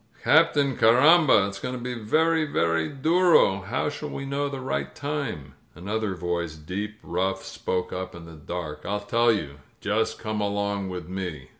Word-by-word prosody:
"Captain, 145 Hz, -4 st, +4 dB
carrambal 130 Hz, -, +6 dB
It's 100 Hz, -1 st, -7 dB
going 125 Hz, -, -4 dB
to -, -, -5 dB
be 125 Hz, +1 st, -4 dB
very, 160 Hz, +8 st, +2 dB
very 85 Hz, -, 0 dB
durol 155 Hz, -, +3 dB
How 115 Hz, +8 st, -1 dB
shall 150 Hz, 0 st, -5 dB
we 135 Hz, -, -5 dB
know 140 Hz, +1 st, -1 dB
the 135 Hz, -1 st, -5 dB
right 130 Hz, +1 st, -3 dB
time?" 140 Hz, -, -4 dB, 0.2 s
Another 100 Hz, +3 st, -3 dB
voice, 85 Hz, -2 st, -3 dB
deep, 95 Hz, +7 st, -5 dB
rough, 95 Hz, +2 st, -1 dB
spoke 90 Hz, -1 st, -3 dB
up 95 Hz, -1 st, -5 dB
in 85 Hz, -1 st, -10 dB
the 85 Hz, -, -11 dB
dark. 75 Hz, -1 st, -6 dB
"I'll 105 Hz, +2 st, -2 dB
tell 115 Hz, +3 st, +3 dB
you. 75 Hz, -10 st, -3 dB, 0.2 s
Just 105 Hz, +2 st, 0 dB
come 110 Hz, -1 st, -3 dB
along 100 Hz, -1 st, -1 dB
with 90 Hz, -3 st, -6 dB
me." 90 Hz, -7 st, -5 dB
105 Hz, 170 wpm, -25 LUFS, 90-135 Hz, 0.2 s, carrambal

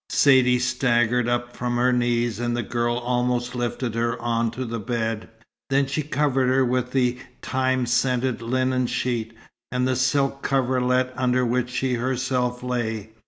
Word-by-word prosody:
Saidee 130 Hz, -3 st, +5 dB
staggered 125 Hz, -1 st, +1 dB
up 120 Hz, 0 st, -2 dB
from 120 Hz, 0 st, -2 dB
her 125 Hz, +1 st, +3 dB
knees, 120 Hz, -1 st, 0 dB
and 120 Hz, 0 st, -1 dB
the 120 Hz, -, -1 dB
girl 120 Hz, +2 st, -1 dB
almost 125 Hz, 0 st, -1 dB
lifted 120 Hz, -1 st, -2 dB
her 115 Hz, +1 st, -1 dB
on 115 Hz, -1 st, 0 dB
to 125 Hz, +3 st, -5 dB
the 115 Hz, 0 st, -4 dB
bed. 115 Hz, -1 st, -3 dB, 0.4 s
Then 135 Hz, +1 st, +3 dB
she 135 Hz, +3 st, -2 dB
covered 140 Hz, -3 st, +1 dB
her 130 Hz, 0 st, +3 dB
with 125 Hz, 0 st, 0 dB
the 125 Hz, -1 st, +1 dB, 0.2 s
thyme 130 Hz, -1 st, 0 dB
scented 125 Hz, 0 st, 0 dB
linen 130 Hz, +1 st, 0 dB
sheet, 120 Hz, -2 st, -2 dB, 0.4 s
and 125 Hz, +1 st, 0 dB
the 130 Hz, -, +1 dB
silk 135 Hz, +2 st, +1 dB
coverlet 130 Hz, -1 st, +1 dB
under 125 Hz, 0 st, +1 dB
which 125 Hz, +1 st, 0 dB
she 130 Hz, 0 st, -1 dB
herself 125 Hz, 0 st, -1 dB
lay. 110 Hz, -4 st, -3 dB
125 Hz, 160 wpm, -24 LUFS, 120-130 Hz, 0.4 s, Saidee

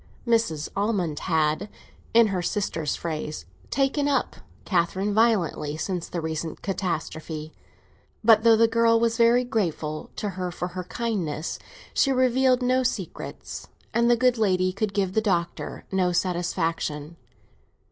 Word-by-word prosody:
Mrs. 225 Hz, -11 st, +1 dB
Almond 195 Hz, -7 st, 0 dB
had, 160 Hz, +3 st, 0 dB, 0.4 s
in 230 Hz, -1 st, +6 dB
her 185 Hz, -2 st, -1 dB
sister's 170 Hz, -5 st, -1 dB
phrase, 155 Hz, -, -4 dB, 0.2 s
"taken 275 Hz, +1 st, +1 dB
up" 280 Hz, -2 st, 0 dB, 0.3 s
Catherine 190 Hz, +2 st, +1 dB
violently 195 Hz, -9 st, +2 dB
since 180 Hz, 0 st, -3 dB
the 175 Hz, -, -3 dB
recent 160 Hz, 0 st, -4 dB
catastrophe; 160 Hz, -4 st, -3 dB, 0.7 s
but 220 Hz, -1 st, +7 dB
though 230 Hz, -1 st, +7 dB
the 230 Hz, +1 st, +5 dB
girl 230 Hz, 0 st, +3 dB
was 230 Hz, 0 st, +1 dB
very 235 Hz, +1 st, +5 dB
grateful 165 Hz, -, -2 dB
to 210 Hz, -, -2 dB
her 185 Hz, -1 st, -3 dB
for 175 Hz, +1 st, -4 dB
her 180 Hz, 0 st, -6 dB
kindness, 180 Hz, -9 st, -3 dB, 0.3 s
she 275 Hz, -, +3 dB
revealed 255 Hz, 0 st, +3 dB
no 255 Hz, +1 st, +3 dB
secrets, 230 Hz, -8 st, -4 dB, 0.3 s
and 235 Hz, 0 st, +3 dB
the 240 Hz, -, +5 dB
good 250 Hz, 0 st, +3 dB
lady 185 Hz, -3 st, +2 dB
could 200 Hz, 0 st, -2 dB
give 190 Hz, -2 st, 0 dB
the 220 Hz, -, +2 dB
Doctor 175 Hz, -5 st, -2 dB
no 185 Hz, -2 st, +2 dB
satisfaction. 165 Hz, -3 st, -1 dB
195 Hz, 135 wpm, -25 LUFS, 170-230 Hz, 0.7 s, but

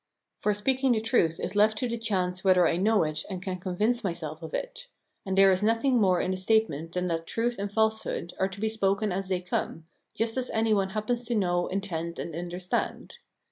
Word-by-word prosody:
For 210 Hz, -1 st, +1 dB
speaking 260 Hz, +4 st, +2 dB
the 220 Hz, -, +1 dB
truth 215 Hz, -8 st, +1 dB
is 190 Hz, -, -4 dB
left 215 Hz, +1 st, +4 dB
to 250 Hz, -, -1 dB
the 235 Hz, -, -2 dB
chance 190 Hz, -5 st, -1 dB
whether 185 Hz, -3 st, +5 dB
I -, -, +1 dB
know 210 Hz, +2 st, +3 dB
it 155 Hz, 0 st, -2 dB
and 190 Hz, -2 st, -4 dB
can 185 Hz, 0 st, -4 dB
convince 210 Hz, +7 st, 0 dB
myself 165 Hz, -4 st, -3 dB
of 160 Hz, -1 st, -7 dB
it; -, -, -5 dB, 0.4 s
and 190 Hz, 0 st, -1 dB
there 195 Hz, 0 st, +7 dB
is 185 Hz, +1 st, +2 dB
nothing 230 Hz, +3 st, +2 dB
more 185 Hz, -3 st, +3 dB
in 185 Hz, -, 0 dB
the 185 Hz, -, -2 dB
statement 185 Hz, -6 st, +1 dB
than 180 Hz, 0 st, -1 dB
that 165 Hz, -2 st, -2 dB
truth 235 Hz, +1 st, -1 dB
and 200 Hz, 0 st, -3 dB
falsehood 220 Hz, -5 st, 0 dB
are 190 Hz, -, +2 dB
to 195 Hz, +1 st, -10 dB
be 220 Hz, -, 0 dB
spoken 210 Hz, -1 st, +1 dB
as 190 Hz, +1 st, -2 dB
they 185 Hz, -1 st, -1 dB
come, 170 Hz, -2 st, -3 dB, 0.3 s
just 225 Hz, +2 st, 0 dB
as 255 Hz, -1 st, +2 dB
any 220 Hz, 0 st, +1 dB
one 195 Hz, -2 st, +1 dB
happens 235 Hz, +3 st, -1 dB
to 240 Hz, -, -1 dB
know, 175 Hz, -4 st, +1 dB
intend, 170 Hz, -4 st, -3 dB
and 165 Hz, -, -5 dB
understand. 180 Hz, -, -3 dB
195 Hz, 220 wpm, -27 LUFS, 180-220 Hz, 0.4 s, there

